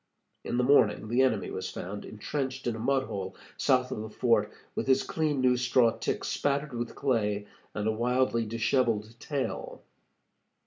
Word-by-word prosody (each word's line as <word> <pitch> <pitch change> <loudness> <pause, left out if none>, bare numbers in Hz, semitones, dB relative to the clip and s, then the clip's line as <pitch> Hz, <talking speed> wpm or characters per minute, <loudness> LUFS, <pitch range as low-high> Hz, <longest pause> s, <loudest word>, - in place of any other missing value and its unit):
In 120 - -2
the 125 - +3
morning 115 -5 +4
the 120 +3 +3
enemy 120 -6 +1
was - - -4
found 100 +3 -6
intrenched 130 +4 -4
in 120 -2 0
a - - -6
mud 135 +3 +2
hole, 95 -6 -5 0.2
south 125 -1 +2
of - - -3
the 110 - -6
fort, 115 +2 +2 0.2
with - - -3
his 135 0 +4
clean 150 -4 0
new 125 -1 +4
straw 125 -1 +3
tick 115 0 -3
spattered 140 0 -1
with 120 0 -4
clay, 105 -6 0 0.3
and 105 0 -1
a - - +3
wildly 120 +1 +1
disheveled 115 -1 +1
tail. 140 -3 -4
120 Hz, 170 wpm, -29 LUFS, 110-130 Hz, 0.3 s, morning